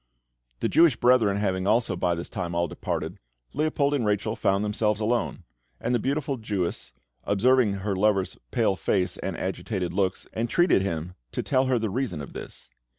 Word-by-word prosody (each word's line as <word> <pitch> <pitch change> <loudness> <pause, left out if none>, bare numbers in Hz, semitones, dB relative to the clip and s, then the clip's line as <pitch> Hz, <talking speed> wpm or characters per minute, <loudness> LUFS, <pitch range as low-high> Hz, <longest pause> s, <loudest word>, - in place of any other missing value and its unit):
The - - +2
Jewish 165 -6 +5
brethren 115 -5 +4
having 95 -2 0
also 110 -3 +2
by 90 -1 +1
this 85 - -5
time 85 -2 -4
all 85 0 +1
departed, - - -4 0.3
Leopold 145 -1 +1
and 140 -4 +1
Rachel 105 +1 0
found 100 +2 +1
themselves 105 0 0
alone; 115 +2 -1 0.4
and 120 - -1
the 120 - +3
beautiful 140 +2 -1
Jewess, 100 - -3 0.3
observing 110 +2 +3
her 100 0 -2
lover's 95 -1 +1
pale 115 -6 +2
face 95 -1 0
and - - -4
agitated 95 -6 -3
looks, 95 -1 0
entreated 120 - +3
him 85 -2 -3 0.2
to - - -2
tell 130 -1 +2
her 130 -1 +2
the 110 -3 -1
reason 115 - -2
of 70 - -8
this. - - -9
105 Hz, 170 wpm, -26 LUFS, 95-125 Hz, 0.4 s, Jewish